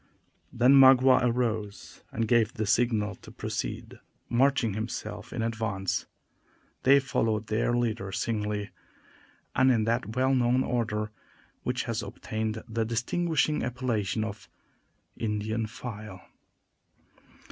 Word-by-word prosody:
Then 125 Hz, +3 st, +4 dB
Magua 130 Hz, -1 st, +7 dB
arose 115 Hz, -4 st, -2 dB
and 115 Hz, 0 st, -1 dB
gave 115 Hz, 0 st, +3 dB
the 110 Hz, -2 st, -1 dB
signal 105 Hz, -1 st, +1 dB
to -, -, -14 dB
proceed, -, -, -5 dB, 0.3 s
marching 120 Hz, -2 st, +2 dB
himself 110 Hz, +3 st, -5 dB
in -, -, -2 dB
advance. 110 Hz, -4 st, -2 dB, 0.7 s
They 140 Hz, +2 st, +6 dB
followed 115 Hz, -5 st, 0 dB
their 115 Hz, +3 st, 0 dB
leader 110 Hz, -5 st, -1 dB
singly, 105 Hz, -1 st, -2 dB, 0.8 s
and 130 Hz, 0 st, +5 dB
in 115 Hz, -3 st, +2 dB
that 115 Hz, 0 st, -1 dB
well 130 Hz, +1 st, +2 dB
known 125 Hz, 0 st, +3 dB
order 105 Hz, -3 st, -1 dB, 0.5 s
which 125 Hz, 0 st, -1 dB
has 115 Hz, -1 st, -2 dB
obtained 110 Hz, +2 st, -4 dB
the 115 Hz, 0 st, -1 dB
distinguishing 150 Hz, +7 st, 0 dB
appellation 115 Hz, -5 st, -1 dB
of 105 Hz, -2 st, -7 dB, 0.7 s
"Indian 110 Hz, 0 st, -2 dB
file." 110 Hz, -5 st, -8 dB
115 Hz, 115 wpm, -28 LUFS, 110-125 Hz, 0.8 s, Magua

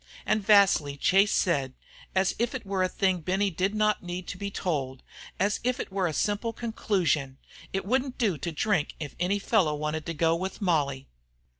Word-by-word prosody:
And 215 Hz, -, +1 dB
vastly 195 Hz, -9 st, +4 dB
Chase 195 Hz, +7 st, +4 dB
said, 140 Hz, -8 st, +1 dB, 0.4 s
as 190 Hz, 0 st, +2 dB
if 240 Hz, +2 st, 0 dB
it 255 Hz, -, -5 dB
were 195 Hz, -1 st, -1 dB
a 185 Hz, -, +2 dB
thing 190 Hz, -1 st, +1 dB
Benny 190 Hz, +4 st, 0 dB
did 190 Hz, +5 st, -1 dB
not 215 Hz, 0 st, +2 dB
need 175 Hz, 0 st, -5 dB
to -, -, -5 dB
be 200 Hz, 0 st, -3 dB
told, 140 Hz, -10 st, -3 dB, 0.4 s
as 200 Hz, +2 st, +1 dB
if 250 Hz, +1 st, 0 dB
it -, -, -5 dB
were 190 Hz, -2 st, 0 dB
a -, -, -1 dB
simple 205 Hz, +7 st, -1 dB
conclusion: 185 Hz, -, -1 dB, 0.3 s
"It 195 Hz, 0 st, -2 dB
wouldn't 255 Hz, +4 st, 0 dB
do 200 Hz, -, 0 dB
to 170 Hz, -, -3 dB
drink 170 Hz, 0 st, 0 dB
if 145 Hz, -3 st, -6 dB
any 185 Hz, +3 st, +1 dB
fellow 195 Hz, -7 st, +2 dB
wanted 150 Hz, +1 st, -3 dB
to 165 Hz, -, -3 dB
go 165 Hz, +1 st, +2 dB
with 190 Hz, +3 st, -4 dB
Molly." 145 Hz, -9 st, 0 dB
190 Hz, 190 wpm, -27 LUFS, 160-205 Hz, 0.4 s, vastly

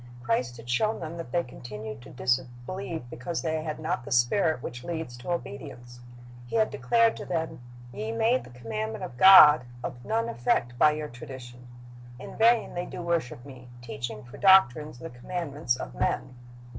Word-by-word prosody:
Christ 120 Hz, 0 st, -1 dB
had 115 Hz, +1 st, -12 dB
shown 215 Hz, -, +1 dB
them 165 Hz, +1 st, -6 dB
that 165 Hz, -8 st, -7 dB
they 175 Hz, -, +1 dB
continued 110 Hz, -3 st, -8 dB
to 135 Hz, -, -13 dB
disbelieve 125 Hz, +6 st, -3 dB
because 165 Hz, +7 st, -4 dB
they 160 Hz, -1 st, -1 dB
had 155 Hz, -1 st, -4 dB
not 160 Hz, +4 st, -2 dB
the 145 Hz, -, -9 dB
spirit 135 Hz, +4 st, +2 dB
which 120 Hz, 0 st, -6 dB
leads 160 Hz, -5 st, -5 dB
to 120 Hz, -, -9 dB
obedience. 120 Hz, -7 st, -6 dB, 0.5 s
He -, -, -5 dB
had 220 Hz, -1 st, +2 dB
declared 225 Hz, -, +2 dB
to -, -, -7 dB
them, 160 Hz, -5 st, -3 dB, 0.3 s
"Ye 110 Hz, +1 st, -4 dB
made 230 Hz, -, +2 dB
the -, -, -13 dB
commandment 110 Hz, -3 st, -5 dB
of 120 Hz, -, -7 dB
God 155 Hz, -4 st, +9 dB, 0.2 s
of 120 Hz, -, -6 dB
none 225 Hz, -, 0 dB
effect 120 Hz, -, 0 dB
by 150 Hz, 0 st, +6 dB
your 150 Hz, 0 st, -4 dB
tradition.... 125 Hz, -1 st, -10 dB, 0.5 s
In 125 Hz, -, -10 dB
vain 230 Hz, +1 st, +3 dB
they 175 Hz, 0 st, -4 dB
do 175 Hz, -, -7 dB
worship 165 Hz, -8 st, -2 dB
Me, 130 Hz, -3 st, -12 dB, 0.2 s
teaching 115 Hz, -1 st, -6 dB
for 120 Hz, -, -12 dB
doctrines 155 Hz, -8 st, +5 dB
the 125 Hz, -, -8 dB
commandments 145 Hz, 0 st, -3 dB
of -, -, -7 dB
men." -, -, -1 dB
130 Hz, 175 wpm, -27 LUFS, 120-170 Hz, 0.5 s, God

